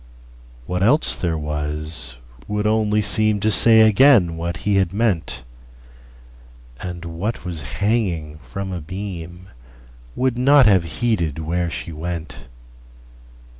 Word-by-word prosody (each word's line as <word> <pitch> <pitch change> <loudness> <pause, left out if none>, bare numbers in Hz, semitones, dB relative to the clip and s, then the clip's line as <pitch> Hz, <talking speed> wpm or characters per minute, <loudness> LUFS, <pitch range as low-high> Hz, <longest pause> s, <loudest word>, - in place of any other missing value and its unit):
What 90 +4 -3
else 130 +10 +3
there 85 -3 -2
was 75 -2 -4 0.3
would 105 0 -2
only 105 -1 +2
seemTo 105 +1 +2
say 110 +1 +6
again 110 -5 +5
what 85 0 -4
he 105 -1 +2
had 95 -3 +1
meant; 100 - -1 1.4
And 90 -1 -7
what 90 +6 -4
was 85 -3 -5
hanging 85 -3 -2
from 100 +3 -7
a 90 -2 -5
beamWould 80 - -7
not 135 +2 +5
have 95 -5 +4 0.2
heeded 85 -11 0
where 85 +2 -2
she 85 - -6
went. 80 -1 -6
90 Hz, 115 wpm, -20 LUFS, 80-105 Hz, 1.4 s, say